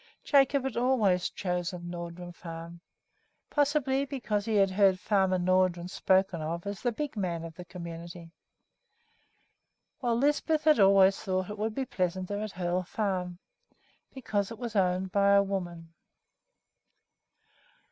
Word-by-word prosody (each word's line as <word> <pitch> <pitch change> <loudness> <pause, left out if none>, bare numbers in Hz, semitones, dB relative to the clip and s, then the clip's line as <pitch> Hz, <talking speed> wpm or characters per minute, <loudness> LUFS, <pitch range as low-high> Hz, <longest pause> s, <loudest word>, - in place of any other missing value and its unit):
Jacob 280 -1 +3
had 265 -3 -3
always 225 -8 +2
chosen 180 -1 -4
Nordrum 175 0 -7
Farm, 170 0 -9 0.7
probably 285 -2 +1
because 235 -7 -2
he 225 -1 -1
had 195 -2 +4
heard 190 -1 +4
Farmer 190 -2 +2
Nordrum 180 -1 +1
spoken 190 -2 +1
of 170 +3 -4
as 200 -1 -5
the 245 - 0
big 290 +3 -4
man 175 -5 -2
of 165 -1 -8
the 180 +2 -10
community; 170 -1 -9 1.7
while 240 -3 0
Lisbeth 295 +3 +1
had 305 -3 +5
always 195 -1 +6
thought 185 -1 -2
that - - -4
it 210 - -11
would 215 +1 -2
be 270 - -1
pleasanter 185 0 -2
at 215 -2 -5
Hoel 180 0 -1
Farm 180 -2 -3 0.7
because 210 -7 -2
it 230 - -8
was 235 -1 -6
owned 185 -1 +1
by 200 0 +4
a 200 0 +6
woman. 175 -4 -5
190 Hz, 140 wpm, -29 LUFS, 175-220 Hz, 1.7 s, always